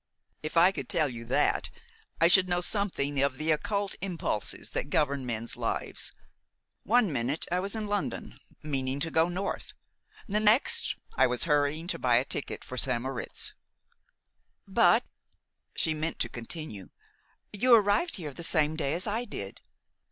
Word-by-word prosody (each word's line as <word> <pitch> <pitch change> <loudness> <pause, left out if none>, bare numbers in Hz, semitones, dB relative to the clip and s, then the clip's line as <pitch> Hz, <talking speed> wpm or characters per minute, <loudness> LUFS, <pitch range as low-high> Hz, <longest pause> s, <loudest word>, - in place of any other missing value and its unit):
"If 155 +2 -4
I 175 +3 +7
could 150 -9 -6
tell 155 -2 +2
you 115 -3 -7
that, - - +1 0.5
I 165 - +6
should 185 +1 +5
know 175 0 +2
something 175 -9 0
of 140 -1 +1
the 155 +2 0
occult 200 +5 0
impulses 175 - -2
that - - -3
govern 140 -3 0
men's 115 0 -1
lives. - - -2 0.7
One 220 -6 +2
minute 130 +5 -1
I 180 - +2
was 195 +3 -3
in 220 -1 -3
London, 205 -1 -3 0.2
meaning 135 -2 -2
to 165 - -1
go 165 +2 +3
north. 190 +3 -4 0.5
The 210 +1 +1
next 215 +5 +4 0.2
I - - +5
was 125 -1 -2
hurrying 150 0 +1
to 180 - -3
buy 125 -2 +3
a 125 +3 +3
ticket 140 - -3
for 130 - -3
St. 125 -3 +1
Moritz." 130 0 -3 1.1
"But - - +4 0.4
" - - -51
She 160 - +1
meant 155 +2 -3
to - - -1
continue, 120 - -7 0.6
"you 240 +4 +6
arrived 210 - +2
here 155 -7 -6
the 170 - -9
same 155 -2 +3
day 155 -1 -1
as 180 - 0
I 225 +4 -1
did." 100 - -7
160 Hz, 165 wpm, -29 LUFS, 135-195 Hz, 1.1 s, I